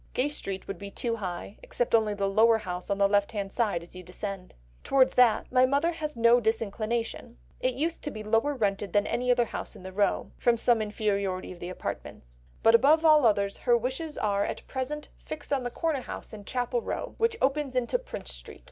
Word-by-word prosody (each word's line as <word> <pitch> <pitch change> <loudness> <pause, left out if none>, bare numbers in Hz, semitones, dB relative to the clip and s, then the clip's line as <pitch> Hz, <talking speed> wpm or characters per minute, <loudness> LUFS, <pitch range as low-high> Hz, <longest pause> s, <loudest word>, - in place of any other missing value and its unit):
Gay 265 +3 +1
Street 195 -10 -5
would 195 -3 -5
be 200 - -7
too 230 +3 -3
high, 185 0 -6
except 245 - -2
only 215 -2 +3
the 200 -1 0
lower 225 +3 +5
house 180 -3 -6
on 200 - 0
the 200 0 +4
left 200 +1 +1
hand 200 -2 -4
side 205 -8 0
as 175 - -15
you 185 - -7
descend. 185 +1 -7 0.3
Towards 265 -1 +4
that 235 -4 +4
my 255 0 +5
mother 285 +6 +2
has 305 -5 -5
no 235 +1 +6
disinclination; 225 - -2 0.2
it 255 -1 0
used 325 +5 -1
to - - -1
be 215 -6 -7
lower 225 +7 +1
rented 205 -4 -1
than 205 -1 +3
any 250 +1 -1
other 245 -1 +4
house - - -6
in 195 - -12
the 190 0 -8
row, 205 +1 0
from 240 -1 +3
some 230 -1 +3
inferiority 200 -3 -1
in 180 - -10
the 175 - -6
apartments. - - -7 0.2
But 225 - +6
above 300 +7 +5
all 305 -5 +7
others 200 -2 +1
her 240 -1 +3
wishes 265 +6 -4
are 200 -1 +1
at - - -4
present 280 +3 -4
fixed 300 -2 -6
on 275 - +1
the 245 - -3
corner 310 +1 -1
house - - -8
in 205 -2 -9
Chapel 245 0 -1
Row - - -4
which 455 0 +2
opens 275 -1 0
into 255 - +1
Prince - - -7
Street. - - -10
225 Hz, 215 wpm, -28 LUFS, 200-260 Hz, 0.3 s, all